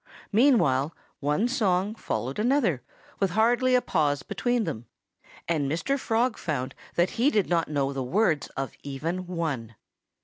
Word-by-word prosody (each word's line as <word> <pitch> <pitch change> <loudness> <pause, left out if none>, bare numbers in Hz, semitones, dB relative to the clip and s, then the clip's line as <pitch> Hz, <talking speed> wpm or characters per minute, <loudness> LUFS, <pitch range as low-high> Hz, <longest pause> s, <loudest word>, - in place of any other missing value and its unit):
Meanwhile 185 - +3 0.2
one 150 +11 +1
song 205 -6 +1
followed 135 - -3
another 225 - +2 0.4
with 195 - +2
hardly 245 +3 +4
a 250 - +3
pause 150 -6 +1
between 245 -2 0
them. 115 - -5 0.6
And 150 -5 0
Mr. 275 - 0
Frog 235 0 0
found 135 -5 -3 0.2
that 175 +2 +2
he 270 - +6
did 210 -9 +1
not 170 -2 +1
know 140 -2 0
the 135 - -3
words 155 - +1
of 135 -1 -2
even 165 +6 -4
one. 145 -11 -3
175 Hz, 145 wpm, -27 LUFS, 140-225 Hz, 0.6 s, he